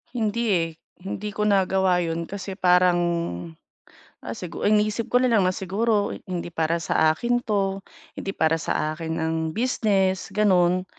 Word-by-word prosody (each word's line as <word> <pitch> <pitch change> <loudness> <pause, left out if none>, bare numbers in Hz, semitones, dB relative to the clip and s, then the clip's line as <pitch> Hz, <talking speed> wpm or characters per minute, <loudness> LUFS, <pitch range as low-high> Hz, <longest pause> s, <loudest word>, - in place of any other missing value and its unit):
Hindi, 230 0 0
eh. 165 -3 +1 0.3
Hindi 195 +2 -5
ko 210 - -4
nagawa 190 -2 +3
'yun 165 0 -3
kasi 195 -1 -6
parang, 180 -1 +4 1.3
ah, 115 - -4
sigu 175 +8 -6
iniisip 215 +2 +2
ko 245 +1 +4
nalang 230 -6 +3
na 185 - +2
siguro 205 +2 0 0.2
hindi 180 -3 -4
para 165 0 -1
sa 155 0 +3
akin 245 +8 -1
'to, 195 -2 -1 0.3
hindi 195 - -3
para 160 +1 +2
sa 155 -1 -1
akin 165 -1 -4
ang 160 0 -1 0.2
business, 200 -6 0
gano'n. 185 -3 +3
190 Hz, 145 wpm, -24 LUFS, 175-210 Hz, 1.3 s, parang